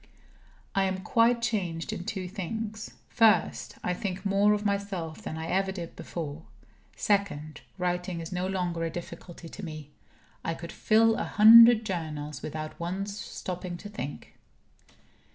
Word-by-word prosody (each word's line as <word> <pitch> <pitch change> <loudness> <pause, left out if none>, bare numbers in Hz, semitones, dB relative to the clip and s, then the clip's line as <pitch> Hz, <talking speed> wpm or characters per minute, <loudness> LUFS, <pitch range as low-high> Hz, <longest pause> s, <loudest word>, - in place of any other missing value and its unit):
I 195 -1 +2
am 190 0 -2
quite 235 +2 +3
changed 180 -9 -1
in 175 - -5
two 190 -3 -3
things. 215 +3 -5 0.2
First: 225 -3 +3
I 180 - 0
think 190 +1 -4
more 200 +1 +4
of 210 0 -2
myself 200 -5 -2
than 160 - -5
I 160 - -4
ever 190 +1 +1
did 175 -3 -7
before. 160 -2 -6 0.5
Second: 185 -7 -1 0.2
writing 180 -1 -2
is 165 +1 -6
no 180 0 -1
longer 180 -3 -1
a 165 - 0
difficulty 175 0 -8
to 200 - -9
me. 155 -3 -7 0.5
I 165 - -2
could 170 +1 -8
fill 225 +1 +4
a - - -1
hundred 230 +1 +8
journals, 150 -7 -4
without 155 0 -6
once 195 +4 -3
stopping 180 -3 -5
to 205 - -9
think. 205 -9 -7
185 Hz, 150 wpm, -28 LUFS, 165-205 Hz, 0.5 s, hundred